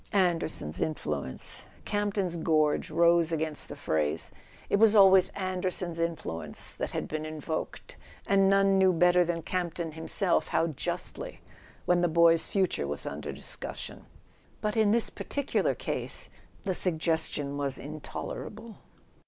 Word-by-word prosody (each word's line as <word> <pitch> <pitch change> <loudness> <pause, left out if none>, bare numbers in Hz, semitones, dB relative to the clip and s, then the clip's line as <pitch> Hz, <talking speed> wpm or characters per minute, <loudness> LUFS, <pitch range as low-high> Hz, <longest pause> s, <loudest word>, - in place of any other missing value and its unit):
"Anderson's 165 - 0
influence 75 - -2
" - - -26
Camp 205 -1 -1
ton's 185 -4 -1
gorge 155 -2 +1
rose 170 -1 +4
against 155 -2 -2
the - - -6
phrase! 80 0 0 0.4
It - - +2
was 220 0 +5
always 190 -2 +7
Anderson's 185 -2 -2
influence 85 - 0
that - - -4
had - - -4
been 155 0 -4
invoked—and 160 +5 -2
none 195 0 +4
knew 190 -1 +5
better 180 +1 +5
than 170 -1 -2
Campton 170 -2 -3
himself 165 +3 +1
how 165 - +1
justly—when 175 - -4
the 175 - +3
boy's 165 0 +5
future 185 - 0
was 70 0 -5
under - - -5
discussion. - - -5 0.5
But 210 0 -2
in 220 -2 +4
this 230 +2 +2
particular 285 -1 -1
case - - -4 0.3
the 190 - -1
suggestion 160 -5 0
was 140 -2 -1
intolerable. 200 +8 -7
170 Hz, 130 wpm, -29 LUFS, 155-190 Hz, 0.5 s, always